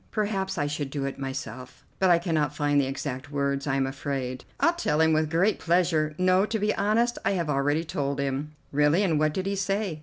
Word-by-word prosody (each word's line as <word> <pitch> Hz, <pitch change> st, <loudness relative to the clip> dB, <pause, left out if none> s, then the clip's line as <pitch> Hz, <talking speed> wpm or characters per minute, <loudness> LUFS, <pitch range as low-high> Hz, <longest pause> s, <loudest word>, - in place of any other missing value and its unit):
Perhaps 205 Hz, -4 st, -2 dB
I 145 Hz, -, +1 dB
should 145 Hz, -1 st, -3 dB
do 140 Hz, 0 st, -3 dB
it 140 Hz, -, -5 dB
myself, 130 Hz, -2 st, -6 dB
but 190 Hz, -, +4 dB
I 175 Hz, -, +6 dB
cannot 155 Hz, -4 st, -1 dB
find 145 Hz, -1 st, +2 dB
the 135 Hz, -, -1 dB
exact 135 Hz, 0 st, -5 dB
words, 140 Hz, 0 st, -1 dB
I 135 Hz, -, +1 dB
am 135 Hz, -1 st, +1 dB
afraid." 135 Hz, -1 st, -4 dB
"I'll 335 Hz, -, +4 dB
tell 155 Hz, -, 0 dB
him 160 Hz, 0 st, +4 dB
with 155 Hz, 0 st, +1 dB
great 180 Hz, +6 st, +2 dB
pleasure. 165 Hz, -3 st, +1 dB
No, 185 Hz, +1 st, +4 dB
to 220 Hz, +2 st, -1 dB
be 210 Hz, 0 st, +1 dB
honest, 230 Hz, +4 st, +1 dB
I 195 Hz, -, +1 dB
have 170 Hz, -5 st, -1 dB
already 145 Hz, +3 st, +1 dB
told 140 Hz, -3 st, -2 dB
him." 140 Hz, +2 st, -2 dB, 0.2 s
"Really, 150 Hz, +6 st, +3 dB
and 165 Hz, -6 st, +2 dB
what 155 Hz, 0 st, +2 dB
did 190 Hz, -, -2 dB
he 200 Hz, 0 st, -1 dB
say?" 195 Hz, -3 st, -1 dB
155 Hz, 220 wpm, -26 LUFS, 140-185 Hz, 0.2 s, I